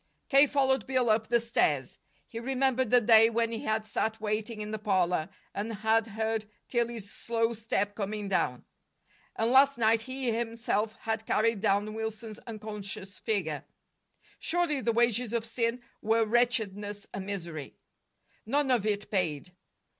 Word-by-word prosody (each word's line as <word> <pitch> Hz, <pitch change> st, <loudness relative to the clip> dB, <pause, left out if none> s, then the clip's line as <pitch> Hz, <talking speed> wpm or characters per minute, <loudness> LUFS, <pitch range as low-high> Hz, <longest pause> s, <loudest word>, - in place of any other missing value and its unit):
K. 275 Hz, +1 st, +7 dB
followed 270 Hz, -1 st, +2 dB
Bill 255 Hz, -3 st, +2 dB
up 215 Hz, 0 st, +1 dB
the 235 Hz, 0 st, +3 dB
stairs. 150 Hz, -, 0 dB, 0.3 s
He 230 Hz, -, -6 dB
remembered 260 Hz, 0 st, +1 dB
the 245 Hz, +1 st, +5 dB
day 225 Hz, 0 st, +7 dB
when 230 Hz, 0 st, 0 dB
he 225 Hz, -, -3 dB
had 220 Hz, 0 st, 0 dB
sat 220 Hz, +1 st, -2 dB
waiting 215 Hz, +1 st, -2 dB
in 210 Hz, 0 st, -4 dB
the 215 Hz, -, -3 dB
parlor, 180 Hz, -5 st, +1 dB, 0.2 s
and 210 Hz, +3 st, -3 dB
had 220 Hz, +1 st, +1 dB
heard 220 Hz, 0 st, -2 dB, 0.2 s
Tillie's 235 Hz, -4 st, -2 dB
slow 230 Hz, 0 st, 0 dB
step 210 Hz, -2 st, -1 dB
coming 205 Hz, 0 st, -3 dB
down. 125 Hz, -10 st, 0 dB, 0.7 s
And 225 Hz, +2 st, +1 dB
last 275 Hz, +1 st, +6 dB
night 225 Hz, -1 st, +3 dB
he 260 Hz, 0 st, -2 dB
himself 225 Hz, -1 st, -1 dB
had 220 Hz, 0 st, -3 dB
carried 225 Hz, 0 st, +2 dB
down 205 Hz, +1 st, +1 dB
Wilson's 220 Hz, 0 st, -5 dB
unconscious 210 Hz, -3 st, -7 dB
figure. 170 Hz, -9 st, -1 dB, 0.8 s
Surely 330 Hz, -5 st, 0 dB
the 230 Hz, -, +1 dB
wages 235 Hz, 0 st, +2 dB
of 230 Hz, -1 st, 0 dB
sin 230 Hz, +1 st, -1 dB, 0.2 s
were 225 Hz, +1 st, +2 dB
wretchedness 210 Hz, -3 st, 0 dB
and 190 Hz, 0 st, -5 dB
misery. 170 Hz, -8 st, -5 dB, 0.7 s
None 280 Hz, +2 st, +1 dB
of 230 Hz, -4 st, +2 dB
it 205 Hz, -1 st, -2 dB
paid. 180 Hz, -4 st, -1 dB
220 Hz, 150 wpm, -29 LUFS, 205-235 Hz, 0.8 s, K